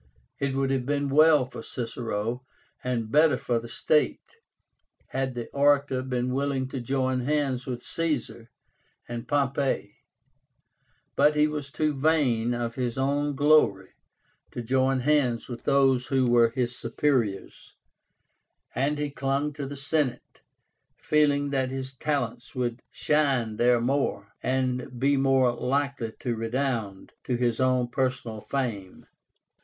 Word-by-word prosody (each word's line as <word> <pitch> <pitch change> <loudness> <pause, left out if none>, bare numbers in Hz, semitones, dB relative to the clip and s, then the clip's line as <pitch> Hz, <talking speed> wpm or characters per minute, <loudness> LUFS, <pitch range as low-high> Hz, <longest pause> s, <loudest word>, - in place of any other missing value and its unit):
It 140 -1 -1
would 135 0 0
have 130 -2 -1
been 145 -1 0
well 150 -1 +5
for 125 - -9
Cicero, 115 0 -4 0.4
and 115 -3 -2
better 150 -1 +5
for 120 -2 -1
the 115 0 -10
state, 155 - 0 0.7
had 130 -1 -2
the 120 -1 -4
orator 140 -2 +2
been 125 -1 -2
willing 135 -1 -1
to 135 - -4
join 130 +1 0
hands 135 -1 -1
with 125 -1 -4
Caesar 145 -8 -3 0.6
and 120 -1 -6
Pompey; 140 -6 0 1.2
but 150 +2 +4
he 150 0 +4
was 150 -2 -3
too 155 +1 0
vain 135 -6 +1
of 120 -1 -3
his 125 -1 -3
own 145 +2 0
glory 145 -10 +3 0.6
to 120 - -6
join 130 +2 +1
hands 130 -4 +1
with 120 -2 -8
those 135 -2 +3
who 130 -2 +2
were 120 -1 +5
his 125 0 -2
superiors, 115 -5 -2 1.0
and 140 +4 0
he 145 -1 -2
clung 140 +2 -1
to 145 -2 -5
the 140 +1 -7
Senate, 145 -1 -2 0.6
feeling 145 -2 +2
that 130 -2 0
his 130 0 -5
talents 140 -2 -3
would 120 -1 -2
shine 135 -8 +1
there 120 +1 +4
more, 125 -5 -1
and 125 -1 -1
be 140 +2 +3
more 135 -2 +3
likely 135 -2 -1
to 120 -5 -1
redound 115 -3 -3
to 125 - -1
his 120 -1 0
own 130 -1 +2
personal 125 -3 -2
fame. 110 -10 -4
130 Hz, 135 wpm, -26 LUFS, 120-140 Hz, 1.2 s, well